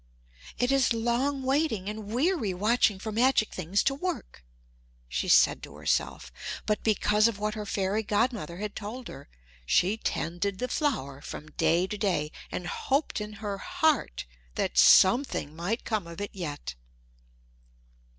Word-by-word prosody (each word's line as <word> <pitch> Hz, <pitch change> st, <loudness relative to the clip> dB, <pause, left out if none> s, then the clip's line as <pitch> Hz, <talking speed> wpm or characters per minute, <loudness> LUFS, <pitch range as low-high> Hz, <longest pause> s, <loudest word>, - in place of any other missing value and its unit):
"It 245 Hz, +2 st, +1 dB
is 270 Hz, -3 st, +3 dB
long 245 Hz, +4 st, 0 dB
waiting 265 Hz, -7 st, 0 dB
and 210 Hz, 0 st, -5 dB
weary 245 Hz, -, 0 dB
watching 215 Hz, +1 st, +2 dB
for 215 Hz, +3 st, -5 dB
magic 235 Hz, 0 st, +2 dB
things 185 Hz, +3 st, 0 dB
to 270 Hz, -, +2 dB
work," 340 Hz, -, -5 dB, 0.7 s
said 65 Hz, 0 st, 0 dB
she -, -, +6 dB
to -, -, -10 dB
herself; 65 Hz, 0 st, -1 dB, 0.3 s
but 210 Hz, -, 0 dB
because 215 Hz, 0 st, +3 dB
of 230 Hz, -3 st, -2 dB
what 210 Hz, +1 st, -2 dB
her 210 Hz, -1 st, -5 dB
fairy 200 Hz, +2 st, 0 dB
godmother 210 Hz, -5 st, -1 dB
had 210 Hz, +1 st, -5 dB
told 225 Hz, +4 st, -6 dB
her, -, -, -11 dB, 0.3 s
she 185 Hz, -, +2 dB
tended 185 Hz, -1 st, -2 dB
the 250 Hz, -, -2 dB
flower 140 Hz, -, -2 dB
from 155 Hz, +1 st, -8 dB
day 170 Hz, +4 st, +2 dB
to 205 Hz, +2 st, -5 dB
day, 175 Hz, -7 st, 0 dB, 0.2 s
and 180 Hz, -, -4 dB
hoped 275 Hz, -, -1 dB
in 210 Hz, 0 st, -6 dB
her 200 Hz, -1 st, -3 dB
heart 320 Hz, -, 0 dB, 0.3 s
that -, -, -1 dB
something 185 Hz, -, +5 dB
might 180 Hz, +8 st, -2 dB
come 215 Hz, -6 st, -1 dB
of 170 Hz, +1 st, -9 dB
it 205 Hz, -, -4 dB
yet. 150 Hz, -, -5 dB
210 Hz, 150 wpm, -28 LUFS, 185-245 Hz, 0.7 s, she